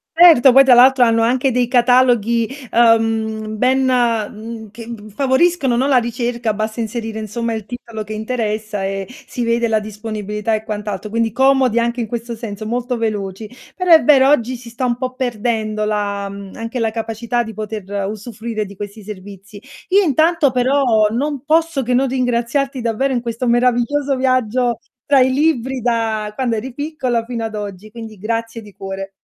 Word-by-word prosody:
Certo, 320 Hz, -7 st, +7 dB
poi 270 Hz, +2 st, +8 dB
tra 265 Hz, -2 st, +6 dB
l'altro 255 Hz, +1 st, +6 dB
hanno 230 Hz, -1 st, +2 dB
anche 255 Hz, +3 st, +2 dB
dei 250 Hz, 0 st, +1 dB
cataloghi, 240 Hz, -2 st, +3 dB, 0.2 s
uhm, 225 Hz, -2 st, +2 dB
ben, 255 Hz, +4 st, +2 dB
mhmm, 230 Hz, -3 st, -1 dB
che 230 Hz, +3 st, -10 dB
g 215 Hz, -2 st, -10 dB
favoriscono, 275 Hz, -, +2 dB
no, 255 Hz, +3 st, +1 dB
la 275 Hz, -, +4 dB
ricerca, 235 Hz, -1 st, -1 dB
basta 215 Hz, +2 st, -3 dB
inserire 225 Hz, 0 st, -4 dB
insomma 225 Hz, +2 st, -3 dB
il 220 Hz, -2 st, -5 dB
titolo 230 Hz, -1 st, -7 dB
che 215 Hz, -, -8 dB
interessa 215 Hz, -2 st, -3 dB
e 195 Hz, 0 st, -3 dB
si 250 Hz, 0 st, -7 dB
vede 235 Hz, 0 st, +1 dB
la 220 Hz, -1 st, +1 dB
disponibilità 210 Hz, 0 st, -4 dB
e 215 Hz, 0 st, -3 dB
quant'altro, 210 Hz, -1 st, -5 dB
quindi 225 Hz, 0 st, -1 dB
comodi 265 Hz, -2 st, +3 dB
anche 235 Hz, +1 st, -1 dB
in 225 Hz, -, -3 dB
questo 235 Hz, +1 st, -5 dB
senso, 215 Hz, -2 st, -7 dB
molto 245 Hz, +2 st, -2 dB
veloci. 210 Hz, -2 st, -3 dB, 0.3 s
Però 365 Hz, -1 st, -2 dB
è 320 Hz, -2 st, +8 dB
vero, 270 Hz, -3 st, +6 dB
oggi 255 Hz, -3 st, +2 dB
si 240 Hz, 0 st, -12 dB
sta 235 Hz, +3 st, -4 dB
un 240 Hz, -1 st, 0 dB
po' 255 Hz, 0 st, -3 dB
perdendo 220 Hz, -3 st, -2 dB
la, 200 Hz, -1 st, -2 dB
mhmm, 200 Hz, -1 st, -10 dB
anche 230 Hz, +2 st, -5 dB
la 225 Hz, -2 st, 0 dB
capacità 230 Hz, +2 st, -2 dB
di 225 Hz, -1 st, -8 dB
poter 215 Hz, -2 st, -6 dB, 0.2 s
usufruire 215 Hz, +1 st, -5 dB
di 200 Hz, 0 st, -12 dB
questi 205 Hz, +2 st, -8 dB
servizi. 200 Hz, 0 st, -11 dB, 0.3 s
Io 390 Hz, +2 st, +4 dB
intanto 315 Hz, -1 st, +3 dB
però, 250 Hz, -4 st, +2 dB
non 275 Hz, +4 st, -2 dB
posso 320 Hz, -2 st, +1 dB
che 250 Hz, 0 st, -1 dB
non 265 Hz, +2 st, +3 dB
ringraziarti 255 Hz, +1 st, -1 dB
davvero 240 Hz, +4 st, 0 dB
in 240 Hz, -, -1 dB
questo 235 Hz, +1 st, -3 dB
meraviglioso 250 Hz, +4 st, +2 dB
viaggio 255 Hz, -2 st, +1 dB, 0.3 s
tra 280 Hz, -2 st, +4 dB
i 255 Hz, 0 st, +3 dB
libri 265 Hz, -3 st, 0 dB
da 225 Hz, -3 st, -1 dB
quando 240 Hz, -1 st, -1 dB
eri 250 Hz, +4 st, -5 dB
piccola 270 Hz, -5 st, -2 dB
fino 230 Hz, -1 st, -4 dB
ad 220 Hz, -1 st, -5 dB
oggi, 205 Hz, 0 st, -7 dB
quindi 220 Hz, -1 st, -10 dB
grazie 230 Hz, +2 st, -3 dB
di 210 Hz, -2 st, -14 dB
cuore. 195 Hz, 0 st, -6 dB
230 Hz, 175 wpm, -18 LUFS, 215-255 Hz, 0.3 s, poi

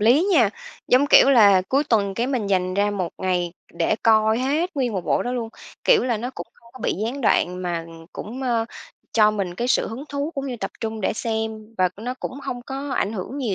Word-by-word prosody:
lý 245 Hz, -, +5 dB
nha! 240 Hz, -, +5 dB, 0.4 s
Giống 260 Hz, +3 st, +5 dB
kiểu 275 Hz, -, +7 dB
là, 200 Hz, -7 st, +6 dB
cuối 280 Hz, +3 st, +2 dB
tuần 205 Hz, -7 st, +1 dB
cái 235 Hz, +4 st, 0 dB
mình 255 Hz, -6 st, -1 dB
dành 185 Hz, -1 st, 0 dB
ra 205 Hz, +1 st, +2 dB
một 185 Hz, -4 st, -2 dB
ngày 180 Hz, -2 st, -1 dB, 0.2 s
để 215 Hz, -, +1 dB
coi 220 Hz, 0 st, +4 dB
hết 295 Hz, +8 st, 0 dB
nguyên 250 Hz, -5 st, 0 dB
một 190 Hz, -, -1 dB
bộ -, -, +1 dB
đó 245 Hz, -, -3 dB
luôn, 235 Hz, -3 st, -3 dB, 0.4 s
kiểu 475 Hz, -, +5 dB
là, 240 Hz, -3 st, 0 dB
nó 245 Hz, +4 st, -4 dB
cũng -, -, -7 dB
không 235 Hz, -, -22 dB
có 260 Hz, -, -12 dB
bị -, -, 0 dB
gián 250 Hz, +5 st, -3 dB
đoạn 180 Hz, -6 st, +1 dB
mà 170 Hz, -2 st, -2 dB, 0.3 s
cũng, 250 Hz, +5 st, -7 dB
ơ, 235 Hz, -3 st, +1 dB, 0.5 s
cho 215 Hz, -2 st, +5 dB
mình 195 Hz, -4 st, -3 dB
cái 240 Hz, +6 st, -2 dB
sự -, -, +2 dB
hứng 250 Hz, +6 st, -7 dB
thú 285 Hz, +2 st, -3 dB
cũng 275 Hz, 0 st, -3 dB
như 250 Hz, -2 st, -4 dB
tập -, -, -4 dB
trung 220 Hz, -1 st, -4 dB
để 190 Hz, -, 0 dB
xem 220 Hz, 0 st, -4 dB
và 185 Hz, -, +4 dB
nó 245 Hz, +4 st, -4 dB
cũng -, -, -4 dB
hông 245 Hz, -3 st, -5 dB
có 275 Hz, +2 st, -6 dB
ảnh 205 Hz, -3 st, 0 dB
hưởng 220 Hz, +7 st, -5 dB
nhiều 230 Hz, -8 st, -1 dB
225 Hz, 235 wpm, -23 LUFS, 205-260 Hz, 0.5 s, kiểu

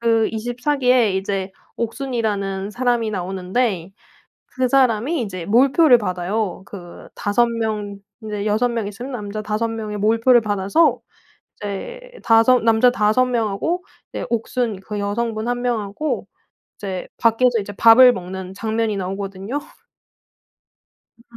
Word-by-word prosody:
그 225 Hz, -1 st, +2 dB
24 245 Hz, +6 st, -2 dB
기에 250 Hz, -6 st, +3 dB
이제 190 Hz, 0 st, -2 dB, 0.3 s
옥순이라는 220 Hz, -6 st, -2 dB
사람이 240 Hz, -1 st, 0 dB
나오는데 190 Hz, 0 st, -2 dB, 0.6 s
그 255 Hz, -1 st, -1 dB
사람이 260 Hz, +3 st, +2 dB
이제 185 Hz, -6 st, -6 dB
몰표를 260 Hz, +4 st, +5 dB
받아요. 185 Hz, 0 st, -2 dB
그 175 Hz, -4 st, -11 dB
5 205 Hz, +4 st, +1 dB
명 215 Hz, -3 st, -3 dB, 0.3 s
이제 210 Hz, -1 st, -4 dB
6 215 Hz, +4 st, +2 dB
명 230 Hz, -3 st, -2 dB
있으면 240 Hz, +7 st, -7 dB
남자 210 Hz, -2 st, -5 dB
5 215 Hz, +2 st, -1 dB
명의 220 Hz, -2 st, -5 dB
몰표를 230 Hz, +4 st, +4 dB
받아서 205 Hz, -, +1 dB, 0.6 s
이제 205 Hz, -, -6 dB, 0.2 s
5 230 Hz, +2 st, +5 dB
남자 225 Hz, +2 st, +4 dB
5 225 Hz, +1 st, +2 dB
명하고 245 Hz, -, -1 dB, 0.3 s
이제 -, -, -4 dB
옥순 230 Hz, -2 st, -2 dB
그 210 Hz, +2 st, -6 dB
여성분 215 Hz, +2 st, -2 dB
1 245 Hz, 0 st, -2 dB
명하고 235 Hz, +4 st, -2 dB, 0.5 s
이제 190 Hz, -3 st, -5 dB
밖에서 235 Hz, +1 st, +3 dB
이제 205 Hz, 0 st, -7 dB
밥을 230 Hz, +5 st, +7 dB
먹는 185 Hz, 0 st, -7 dB
장면이 220 Hz, +1 st, -1 dB
나오거든요? 195 Hz, +6 st, -4 dB, 1.6 s
음. -, -, -21 dB
220 Hz, 240 characters per minute, -20 LUFS, 200-245 Hz, 1.6 s, 밥을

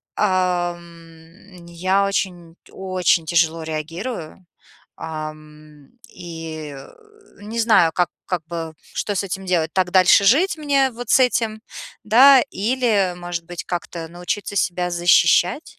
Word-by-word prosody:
ам, 175 Hz, -1 st, -3 dB
я 185 Hz, +4 st, 0 dB
очень 175 Hz, -4 st, -3 dB, 0.2 s
очень 185 Hz, -3 st, 0 dB
тяжело 165 Hz, 0 st, +1 dB
реагирую, 165 Hz, +4 st, -6 dB, 0.5 s
ам, 155 Hz, -2 st, -9 dB, 0.2 s
и, 165 Hz, -5 st, -8 dB
э, 135 Hz, -, -12 dB, 0.5 s
не 225 Hz, +3 st, -6 dB
знаю, 220 Hz, -8 st, +4 dB
как 175 Hz, -2 st, +1 dB, 0.2 s
как 175 Hz, -4 st, -3 dB
бы, 165 Hz, -1 st, -6 dB, 0.2 s
что 205 Hz, -, -2 dB
с 195 Hz, -, -1 dB
этим 190 Hz, 0 st, -6 dB
делать. 165 Hz, -3 st, 0 dB
Так 185 Hz, -1 st, 0 dB
дальше 185 Hz, +2 st, +5 dB
жить 315 Hz, -, +3 dB
мне 275 Hz, -3 st, +1 dB
вот 240 Hz, 0 st, -8 dB
с -, -, +6 dB
этим, 225 Hz, -3 st, +1 dB, 0.4 s
да, 255 Hz, +4 st, +7 dB
или, 210 Hz, -4 st, 0 dB
может 175 Hz, -1 st, -5 dB
быть, 175 Hz, 0 st, -7 dB
как-то 170 Hz, -1 st, -5 dB
научиться 180 Hz, +4 st, -5 dB
себя 180 Hz, -1 st, 0 dB
защищать? 175 Hz, -, +2 dB
175 Hz, 125 wpm, -21 LUFS, 165-205 Hz, 0.5 s, да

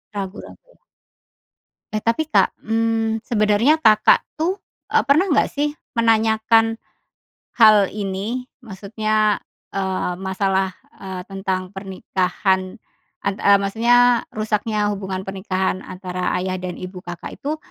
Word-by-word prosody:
Ragu-ragu. 200 Hz, -, -8 dB, 1.1 s
Eh, 215 Hz, -, -1 dB
tapi, 230 Hz, +8 st, 0 dB
Kak, -, -, +3 dB
mmm, 225 Hz, 0 st, 0 dB
sebenarnya 215 Hz, +5 st, +3 dB
Kakak, 215 Hz, -3 st, +5 dB, 0.2 s
tuh, 345 Hz, +4 st, +1 dB, 0.4 s
eee, -, -, +4 dB
pernah 290 Hz, +7 st, +4 dB
nggak, 305 Hz, -, +2 dB
sih, 290 Hz, +1 st, -1 dB, 0.2 s
menanyakan 225 Hz, 0 st, +3 dB, 0.8 s
hal 215 Hz, -4 st, +6 dB
ini? 210 Hz, +5 st, -4 dB, 0.2 s
Maksudnya, 215 Hz, 0 st, -1 dB, 0.3 s
eee, 190 Hz, -2 st, -1 dB
masalah, 190 Hz, 0 st, 0 dB, 0.3 s
eee, 190 Hz, -1 st, -6 dB
tentang 190 Hz, -1 st, -3 dB
pernikahan 190 Hz, 0 st, -1 dB, 0.4 s
an 200 Hz, -, -1 dB
eee, 200 Hz, 0 st, +5 dB
maksudnya 240 Hz, +4 st, +3 dB
rusaknya 215 Hz, -1 st, -1 dB
hubungan 190 Hz, -2 st, -4 dB
pernikahan 190 Hz, -1 st, -2 dB
antara 180 Hz, -1 st, -4 dB
ayah 185 Hz, 0 st, -2 dB
dan 180 Hz, -1 st, -4 dB
ibu 185 Hz, 0 st, -7 dB
Kakak 175 Hz, -1 st, -8 dB
itu 300 Hz, +3 st, -3 dB
210 Hz, 110 wpm, -21 LUFS, 190-225 Hz, 1.1 s, hal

